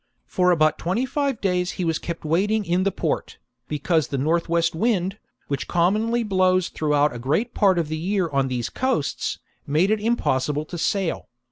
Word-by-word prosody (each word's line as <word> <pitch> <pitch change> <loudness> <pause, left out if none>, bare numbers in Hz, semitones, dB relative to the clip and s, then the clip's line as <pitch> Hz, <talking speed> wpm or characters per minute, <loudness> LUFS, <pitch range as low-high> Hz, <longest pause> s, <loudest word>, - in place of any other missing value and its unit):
For 180 -1 +1
about 155 -3 +3
twenty 190 +9 0
five 275 -1 -1
days 180 -2 0
he 180 - -3
was 165 -1 0
kept 170 -1 -6
waiting 205 +7 +1
in 175 +1 +1
the 200 - +2
port, - - -3 0.3
because 155 +1 0
the 140 - -3
north 165 +5 0
west 170 0 +2
wind, 195 +1 0 0.3
which 140 -1 -3
commonly 215 +7 +1
blows 185 -3 +2
throughout 150 -1 +1
a 120 - -6
great 150 - 0
part 195 -4 +3
of 165 -3 0
the 155 +1 -3
year 185 +1 0
on 140 -3 0
these 125 -2 -3
coasts, 260 - -1 0.3
made 160 +8 +2
it 215 -1 +1
impossible 150 - 0
to 175 - -7
sail. 190 0 -1
175 Hz, 180 wpm, -23 LUFS, 155-205 Hz, 0.3 s, about